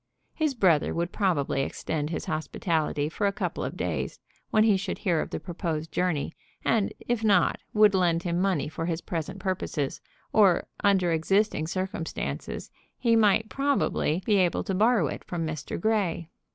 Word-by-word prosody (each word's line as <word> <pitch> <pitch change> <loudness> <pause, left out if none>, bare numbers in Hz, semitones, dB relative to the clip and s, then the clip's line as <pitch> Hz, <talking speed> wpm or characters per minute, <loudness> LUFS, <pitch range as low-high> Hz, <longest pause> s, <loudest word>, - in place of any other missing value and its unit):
His 310 -4 0
brother 180 -9 +3
would 170 +1 -1
probably 170 -9 +1
extend 150 +2 -3
his 165 - -4
hospitality 155 -1 -1
for 200 +6 -1
a - - +2
couple - - -3
of - - -4
days - - -2 0.3
when 215 - +4
he 215 -2 +5
should 190 - -3
hear 170 -4 +1
of - - -4
the - - -4
proposed 165 -3 -4
journey, 175 -4 0 0.3
and, 220 -3 +2 0.2
if 240 -2 0
not, 200 -5 +3
would 210 -1 +5
lend 170 -3 +2
him 175 0 0
money 190 -7 +1
for 165 +2 -4
his 165 -2 -1
present 170 +3 -4
purposes, 185 -7 -2 0.3
or 200 -5 +5 0.2
under 190 -4 +3
existing 165 0 +1
circumstances 185 -2 -4 0.3
he 230 -2 +3
might 220 0 +4
probably 270 - 0
be 210 -2 +3
able 180 -2 +2
to 195 - -2
borrow 215 -1 +3
it - - -4
from 170 -2 -3
Mr. 155 -3 -4
Grey. 185 -5 0
180 Hz, 165 wpm, -27 LUFS, 160-205 Hz, 0.3 s, he